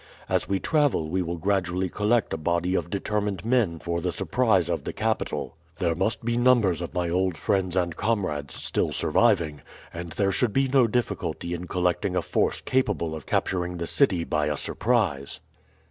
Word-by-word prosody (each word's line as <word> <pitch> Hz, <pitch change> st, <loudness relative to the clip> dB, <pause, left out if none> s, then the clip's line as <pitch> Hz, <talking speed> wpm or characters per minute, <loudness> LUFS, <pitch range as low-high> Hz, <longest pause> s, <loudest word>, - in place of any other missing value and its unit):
As -, -, 0 dB
we 100 Hz, -1 st, +1 dB
travel 145 Hz, -, +2 dB
we 95 Hz, +3 st, 0 dB
will 85 Hz, 0 st, -3 dB
gradually 95 Hz, 0 st, 0 dB
collect 110 Hz, +4 st, +1 dB
a -, -, -1 dB
body 85 Hz, +3 st, 0 dB
of 90 Hz, -, -1 dB
determined 100 Hz, 0 st, -2 dB
men 115 Hz, -9 st, +2 dB
for 85 Hz, +1 st, -3 dB
the 90 Hz, +1 st, -1 dB
surprise 95 Hz, 0 st, +1 dB
of 85 Hz, -1 st, -2 dB
the -, -, -4 dB
capital. 110 Hz, -6 st, -2 dB, 0.2 s
There 85 Hz, -1 st, +1 dB
must 110 Hz, +7 st, -1 dB
be 120 Hz, 0 st, 0 dB
numbers 120 Hz, -8 st, +3 dB
of 85 Hz, -, -6 dB
my 90 Hz, -1 st, 0 dB
old 90 Hz, 0 st, 0 dB
friends 95 Hz, +1 st, 0 dB
and 85 Hz, -3 st, 0 dB
comrades 75 Hz, -11 st, -1 dB
still -, -, -1 dB
surviving, 75 Hz, -3 st, +2 dB, 0.3 s
and 85 Hz, 0 st, -6 dB
there 95 Hz, +4 st, 0 dB
should 105 Hz, +3 st, +1 dB
be 135 Hz, 0 st, +2 dB
no 130 Hz, -2 st, +4 dB
difficulty 110 Hz, -6 st, -2 dB
in 85 Hz, +1 st, -5 dB
collecting 90 Hz, -1 st, 0 dB
a -, -, +1 dB
force -, -, 0 dB
capable 105 Hz, -, 0 dB
of 80 Hz, -2 st, -8 dB
capturing 90 Hz, -1 st, -1 dB
the 85 Hz, -, -3 dB
city 95 Hz, -, +2 dB
by 75 Hz, -2 st, 0 dB
a 75 Hz, -1 st, -1 dB
surprise." 95 Hz, -, 0 dB
90 Hz, 180 wpm, -26 LUFS, 85-110 Hz, 0.3 s, no